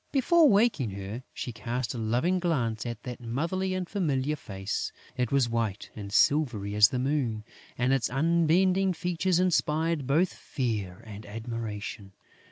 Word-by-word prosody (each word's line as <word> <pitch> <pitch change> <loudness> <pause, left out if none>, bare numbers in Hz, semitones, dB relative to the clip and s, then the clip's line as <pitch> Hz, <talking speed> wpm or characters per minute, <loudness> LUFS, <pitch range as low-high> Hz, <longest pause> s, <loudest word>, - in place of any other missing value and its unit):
Before 305 +3 +5
waking 205 - +3
her, 100 +5 -6
she 125 - -5
cast 120 +3 -3
a 120 - -5
loving 125 +12 +1
glance 120 -11 -1
at 120 -2 -6
that 125 -1 -7
motherly 170 +11 -1
and 185 -1 -3
familiar 150 -7 0
face. 95 -7 -4 0.2
It 125 -2 -1
was 135 -3 +3
white 115 -4 -2
and 100 -2 -7
silvery 115 -6 +2
as 105 0 +7
the 130 - -2
moon; 125 -5 -1 0.3
and 125 +2 +2
its 135 -3 +1
unbending 170 +6 +3
features 180 +1 0
inspired 160 -4 +1
both 165 +7 +2
fear 105 - -3
and 105 -1 -9
admiration. 110 -2 -6
130 Hz, 150 wpm, -28 LUFS, 110-170 Hz, 0.3 s, as